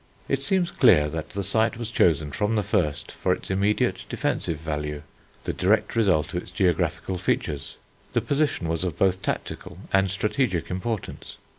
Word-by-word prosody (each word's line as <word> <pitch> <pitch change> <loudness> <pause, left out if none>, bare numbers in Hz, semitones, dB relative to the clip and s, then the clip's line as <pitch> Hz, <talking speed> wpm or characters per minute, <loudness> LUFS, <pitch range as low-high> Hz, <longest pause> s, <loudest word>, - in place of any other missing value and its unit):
It 135 0 0
seems 175 +4 +1
clear 75 -4 +5
that 80 0 -5
the 100 - -3
site 110 +2 +1
was 115 -1 -5
chosen 80 -7 +3
from 110 0 0
the 105 - +1
first 90 -8 0
for - - 0
its - - -6
immediate 100 +2 +1
defensive 80 - -1
value, 75 -1 -4 0.4
the - - -2
direct - - +2
result 90 -9 +2
of 90 - -1
its - - -13
geographical 90 0 0
features. 75 -5 -1 0.4
The - - +2
position 145 - 0
was 80 +1 -1
of 90 -5 -2
both 95 -1 +2
tactical - - -4 0.2
and 95 0 +4
strategic 100 - 0
importance. 100 +3 -4
95 Hz, 165 wpm, -25 LUFS, 80-105 Hz, 0.4 s, clear